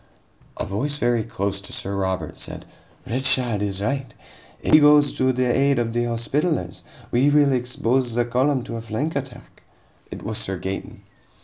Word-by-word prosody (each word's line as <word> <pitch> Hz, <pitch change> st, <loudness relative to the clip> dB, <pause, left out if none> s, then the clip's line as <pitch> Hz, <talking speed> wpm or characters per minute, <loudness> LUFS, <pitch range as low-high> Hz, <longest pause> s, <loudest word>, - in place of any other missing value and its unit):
A -, -, -2 dB
voice 140 Hz, +9 st, -2 dB
very 120 Hz, -4 st, +1 dB
close 100 Hz, -3 st, -3 dB
to 100 Hz, -, -8 dB
Sir 100 Hz, +1 st, -3 dB
Robert 95 Hz, -5 st, -2 dB
said: -, -, -6 dB, 0.4 s
"Richard 125 Hz, -3 st, +3 dB
is 100 Hz, -1 st, -2 dB
right. 135 Hz, +2 st, -2 dB, 0.5 s
If -, -, -1 dB
we 155 Hz, -, +9 dB
go 150 Hz, 0 st, +7 dB
to 135 Hz, -2 st, +1 dB
the 130 Hz, 0 st, 0 dB
aid 140 Hz, 0 st, +3 dB
of 115 Hz, -1 st, -1 dB
the 120 Hz, 0 st, 0 dB
Hospitallers, 120 Hz, -, -1 dB, 0.3 s
we 130 Hz, +4 st, +3 dB
will 145 Hz, -1 st, +4 dB
expose 125 Hz, -1 st, 0 dB
the 120 Hz, 0 st, +2 dB
column 130 Hz, +2 st, +1 dB
to 115 Hz, -, -6 dB
a -, -, -5 dB
flank 115 Hz, +8 st, -3 dB
attack." 130 Hz, -3 st, -7 dB, 0.5 s
It -, -, -8 dB
was 110 Hz, -1 st, -3 dB
Sir 95 Hz, 0 st, -3 dB
Gaeton. 95 Hz, +2 st, -6 dB
120 Hz, 175 wpm, -23 LUFS, 110-135 Hz, 0.5 s, we